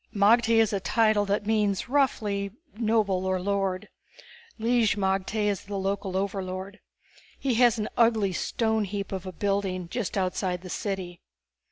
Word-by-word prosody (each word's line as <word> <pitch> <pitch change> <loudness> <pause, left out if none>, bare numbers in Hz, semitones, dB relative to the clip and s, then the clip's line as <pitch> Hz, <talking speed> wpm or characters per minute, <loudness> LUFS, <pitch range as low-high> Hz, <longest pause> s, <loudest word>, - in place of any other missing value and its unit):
"Magte 225 +3 +4
is 225 -2 +3
a 200 - +1
title 215 0 +2
that 205 +1 -1
means 210 -2 +1
roughly 215 -7 +1 0.3
noble 215 -4 +1
or 185 0 +1
lord. 195 -1 -1 0.7
Lig 230 -1 +2
magte 195 +2 0
is 200 -2 -1
the 200 0 -4
local 195 -1 -2
overlord. 195 0 -4 0.6
He 270 -2 0
has 240 -1 +5
an 215 - -2
ugly 225 -5 +3
stoneheap 210 -1 -1
of 190 -1 -4
a - - -4
building 190 -1 -1
just 215 -1 -3
outside 185 -1 -1
the 185 - -7
city. 190 -4 -4
200 Hz, 145 wpm, -27 LUFS, 190-220 Hz, 0.7 s, has